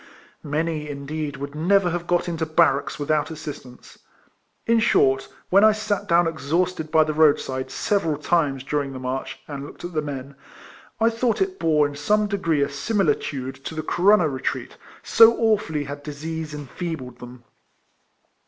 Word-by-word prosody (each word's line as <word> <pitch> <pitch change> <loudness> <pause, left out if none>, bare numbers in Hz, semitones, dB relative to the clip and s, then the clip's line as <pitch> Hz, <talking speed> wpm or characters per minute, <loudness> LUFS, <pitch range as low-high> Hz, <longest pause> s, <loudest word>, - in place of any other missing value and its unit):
Many, 155 0 -2
indeed, 145 +1 -5
would 140 +1 -6
never 180 +4 +2
have 175 0 -4
got 175 0 +1
into 165 -2 -2
barracks 150 -2 +2
without 150 0 0
assistance. 150 -6 -9 0.7
In 230 0 +3
short, 135 - +3 0.2
when 195 +3 +6
I 215 0 +7
sat 215 -1 -2
down 170 +1 +4
exhausted 165 +1 -1
by 155 0 +5
the 155 0 -2
road 155 -1 +5
side 130 0 -4
several 165 -8 0
times 150 -4 0
during 140 -1 -2
the 130 - -6
march, 130 +1 -4
and 140 -2 -6
looked 145 - -10
at 175 - -7
the 155 - 0
men, 140 -2 -6 0.7
I 225 +1 +3
thought 230 0 0
it 380 -1 -1
bore 150 -2 +3
in 145 - -9
some 210 +9 +1
degree 170 -8 0
a - - 0
similitude 145 - -1
to 160 - -6
the 155 - -3
Corunna 180 +2 +4
retreat; 135 -2 -4 0.3
so 230 0 +6
awfully 210 -10 +1
had 145 +1 -7
disease 155 +2 -5
enfeebled 145 -3 -6
them. 125 0 -11
155 Hz, 160 wpm, -23 LUFS, 140-175 Hz, 0.7 s, I